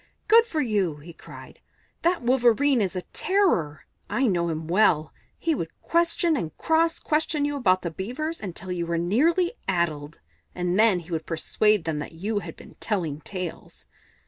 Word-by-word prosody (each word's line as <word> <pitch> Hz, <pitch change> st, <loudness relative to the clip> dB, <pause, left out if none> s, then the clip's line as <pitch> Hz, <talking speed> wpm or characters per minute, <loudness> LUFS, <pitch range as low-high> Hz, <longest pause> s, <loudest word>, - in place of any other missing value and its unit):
"Good 455 Hz, +2 st, +6 dB
for 320 Hz, -8 st, -1 dB
you!" 205 Hz, -, 0 dB
he 155 Hz, +4 st, -12 dB
cried. -, -, -13 dB, 0.4 s
"That 345 Hz, -4 st, +1 dB
Wolverene 245 Hz, +1 st, +3 dB
is 190 Hz, -2 st, -1 dB
a 180 Hz, -, -3 dB
terror 335 Hz, -, +1 dB, 0.2 s
I 265 Hz, -, +1 dB
know 175 Hz, -6 st, +1 dB
him 160 Hz, -1 st, -4 dB
well. 170 Hz, -4 st, +2 dB, 0.2 s
He 330 Hz, -, 0 dB
would 165 Hz, -, -5 dB
question 335 Hz, -1 st, +2 dB
and 165 Hz, -, -4 dB
cross 330 Hz, +1 st, +2 dB
question 305 Hz, -1 st, 0 dB
you 290 Hz, 0 st, -2 dB
about 185 Hz, -9 st, +2 dB
the 170 Hz, -, -3 dB
Beavers 255 Hz, -, -4 dB
until 185 Hz, -2 st, -6 dB
you 170 Hz, -1 st, -2 dB
were 170 Hz, 0 st, -1 dB
nearly 305 Hz, -, +2 dB, 0.2 s
addled, 165 Hz, -5 st, -1 dB, 0.4 s
and 180 Hz, +2 st, 0 dB
then 215 Hz, -5 st, +4 dB
he 170 Hz, +1 st, -14 dB
would 160 Hz, -1 st, -3 dB
persuade 210 Hz, +4 st, +1 dB
them 160 Hz, -2 st, -2 dB
that 150 Hz, -, -7 dB
you 205 Hz, +6 st, -2 dB
had 170 Hz, -4 st, -8 dB
been -, -, -15 dB
telling 165 Hz, -9 st, -2 dB
tales. 180 Hz, 0 st, -7 dB
195 Hz, 170 wpm, -25 LUFS, -, 0.4 s, Good